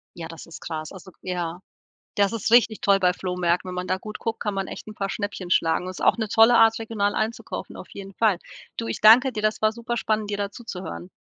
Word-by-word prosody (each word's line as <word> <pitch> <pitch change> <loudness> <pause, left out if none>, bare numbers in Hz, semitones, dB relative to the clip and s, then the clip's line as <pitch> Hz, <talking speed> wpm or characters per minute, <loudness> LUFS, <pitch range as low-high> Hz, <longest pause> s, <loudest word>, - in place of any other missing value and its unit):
Ja, 165 -2 -6
das 165 -1 -10
ist 165 - -11
krass, 155 -2 -5
also, 190 0 -12
k - - -36
ja. 175 -1 -3 0.6
Das 200 +1 +3
ist 225 0 -2
richtig 230 -2 +5
toll 200 -1 +3
bei 180 -1 +4
Flohmärkten, 180 -1 -1
wenn 180 - -5
man 180 0 -4
da 185 - +1
gut 215 +2 -8
guckt, 225 -1 -3
kann 205 -1 -2
man 195 -1 -2
echt - - -8
'n 215 - -9
paar 195 -1 -3
Schnäppchen 200 -4 -5
schlagen. 175 +1 +2
Ist 185 - -7
auch - - +4
'ne 220 -2 -2
tolle 225 +3 +6
Art, 225 0 +5
regional 210 -2 -1
einzukaufen, 225 +2 -4
auf - - -10
jeden 195 -1 -9
Fall. 210 -6 +2 0.4
Du, 230 - -3
ich - - -4
danke 245 +5 +7
dir, 215 - -4
das 215 0 0
war 215 - +4
super 235 +1 -4
spannend, 215 -2 -1
dir 205 - -1
da 200 0 -1
zuzuhören. 180 - -8
200 Hz, 245 wpm, -24 LUFS, 180-220 Hz, 0.6 s, danke